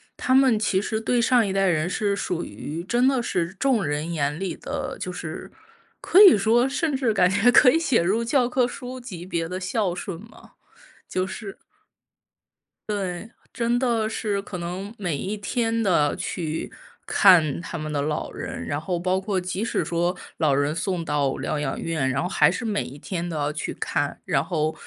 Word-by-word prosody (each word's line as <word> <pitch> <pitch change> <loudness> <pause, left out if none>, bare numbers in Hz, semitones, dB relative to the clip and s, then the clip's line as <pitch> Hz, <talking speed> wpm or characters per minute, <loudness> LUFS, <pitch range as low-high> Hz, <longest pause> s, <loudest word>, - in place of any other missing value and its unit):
他 255 - 0
们 260 -4 +5
其 200 -3 +1
实 220 +2 -2
对 240 +1 +1
上 240 -2 +4
一 195 - -2
代 195 0 +2
人 170 -1 +1
是 200 +1 0
属 180 -3 -3
于 165 +4 -6
真 240 +4 +2
的 265 -2 +3
是 175 -6 -2
众 240 0 +1
人 150 +3 -2
眼 150 0 -1
里 190 -4 -3
的 270 -1 -5
就 180 - -4
是 165 -3 -7 0.5
可 385 - +5
以 375 - +9
说 235 +6 +3
甚 280 +1 -1
至 255 -4 +1
感 180 -3 +4
觉 200 +6 +4
可 250 - +7
以 - - +3
写 275 - +2
入 205 +7 +1
教 245 0 +2
科 250 0 +2
书 250 +1 -6
级 185 -9 -8
别 170 -3 -2
的 185 +1 -4
孝 190 0 -1
顺 180 0 -5
嘛， 225 - -16 0.6
就 185 0 -1
是 195 0 -7 1.3
对， 195 0 -3 0.2
真 235 0 0
的 235 -3 +1
是， 210 -2 -2
可 195 -2 -7
能 185 +5 -5
每 175 -7 -2
一 195 +8 -3
天 225 +2 -1
都 150 -7 +2
去 160 -2 -4 0.3
看 170 -8 +5
他 170 0 -6
们 155 -1 -5
的 145 -1 -1
老 150 0 -2
人， - - -6
然 145 - -2
后 175 +2 -2
包 185 +2 0
括 190 -1 -1
即 185 +4 -3
使 - - 0
说 175 +1 0 0.2
老 150 -4 +2
人 145 +2 +1
送 175 0 -2
到 145 -4 0
疗 150 - -2
养 135 -2 -2
院， 155 -5 -1
然 140 +5 -1
后 180 - -2
还 - - +4
是 - - -3
每 215 -3 -1
一 140 - -10
天 175 +2 -4
都 165 - -4
要 145 0 -1
去 - - -4
看。 - - -2
然 135 - +1
后 155 -3 -1
190 Hz, 210 characters per minute, -24 LUFS, 165-230 Hz, 1.3 s, 以